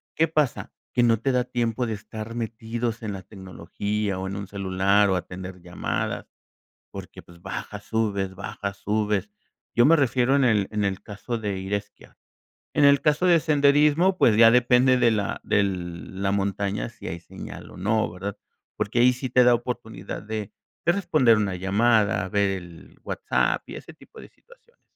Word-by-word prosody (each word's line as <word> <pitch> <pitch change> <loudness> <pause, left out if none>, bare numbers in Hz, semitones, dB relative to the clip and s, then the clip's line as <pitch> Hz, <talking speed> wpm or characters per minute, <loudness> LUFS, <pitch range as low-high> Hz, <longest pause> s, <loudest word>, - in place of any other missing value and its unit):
¿qué 165 - +3
pasa? 150 -5 -1 0.2
Que 120 - +3
no 115 -1 +4
te 135 - +1
da 125 -1 +1
tiempo 120 0 -1
de 110 - -2
estar 110 +2 -7
metidos 115 0 -3
en 110 -3 -4
la 95 - -6
tecnología, 95 +1 -4
o 95 - -4
en 95 - -5
un 100 -1 -5
celular, 100 +1 +2
o 95 - +2
atender 90 +1 -6
llamadas, 90 0 -3 0.6
porque, - - -9
pues, 85 -1 -18
baja, 95 +2 -6
subes, 100 -3 -2
baja, 100 +1 -5
subes. 105 0 -1 0.5
Yo 120 +1 +5
me 165 +3 +6
refiero 130 -2 +2
en 140 - +3
el 105 -5 +3
en 105 -1 -1
el 95 -1 -2
caso 110 +4 -5
de 100 -3 -3
ir 95 +2 -2
a - - +3
esquiar. 100 - -14 0.6
En 145 - +4
el 140 -1 +6
caso 150 +5 +1
de 170 -2 +5
senderismo, 150 +5 +3
pues, 110 -3 +4
ya 115 0 +8
depende 125 +1 +4
de 120 -2 +4
la 105 -3 -1
del 95 -3 -2
de - - -6
la 100 0 +1
montaña 100 +2 -1
si 115 - -12
hay 85 0 -5
señal - - -10
o - - -13
no, 110 +4 +1
¿verdad? 95 +3 -6 0.4
Porque 115 +4 -1
ahí 125 +1 +6
sí 125 0 -5
te 125 0 +5
da 120 0 +6
oportunidad 120 -4 -5
de 110 -1 -5 0.3
de 170 - +4
responder 155 - +3
una 100 -3 0
llamada, 100 +1 +2
ver 100 0 +1
el 85 -1 -14
WhatsApp - - 0
y - - -7
ese - - -11
tipo - - -15
de - - -12
situaciones. 485 0 -24
110 Hz, 185 wpm, -25 LUFS, 100-125 Hz, 0.6 s, ya